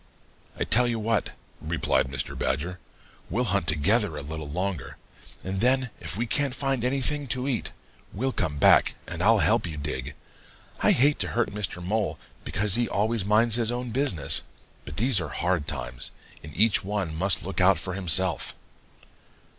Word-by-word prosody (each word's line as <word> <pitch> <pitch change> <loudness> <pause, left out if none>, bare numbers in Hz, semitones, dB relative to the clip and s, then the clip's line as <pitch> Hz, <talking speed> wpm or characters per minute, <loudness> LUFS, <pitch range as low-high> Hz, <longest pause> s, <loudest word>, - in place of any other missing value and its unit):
"'I - - +1
tell 120 +2 +5
you 120 -1 -1
what,' 110 -1 0 0.3
replied - - 0
Mr. 65 -1 -4
Badger. 85 +7 -2 0.5
'We'll 115 +8 0
hunt 95 -4 0
together 85 +4 +2
a - - -5
little 75 0 -6
longer, 90 0 -4 0.5
and 95 +1 -3
then 125 +1 +2
if - - -6
we 120 - 0
can't 135 +3 0
find 135 -2 -1
anything 140 +3 -1
to 125 +2 -3
eat, 125 -6 -2 0.4
we'll 130 +7 -2
come 80 - -2
back, - - +5
and - - -5
I'll - - +5
help - - +2
you 80 -3 -6
dig, 70 -1 -4 0.7
I - - +4
hate 145 +4 +3
to - - 0
hurt 120 - +1
Mr. 100 -4 -4
Mole, 105 +3 -1 0.3
because 105 -1 0
he 120 -1 +5
always 110 +1 0
minds 110 +3 +3
his 115 -1 0
own 120 0 -4
business, 110 - +1 0.4
but 75 - -8
these 115 -3 +5
are 80 - -5
hard 85 0 -1
times, - - -2 0.3
and 75 0 -10
each 105 0 +3
one 95 -4 -2
must 90 +3 +1
look 95 -1 -3
out 95 0 +5
for 95 - -3
himself.' 90 -2 +1
100 Hz, 170 wpm, -26 LUFS, 80-120 Hz, 0.7 s, tell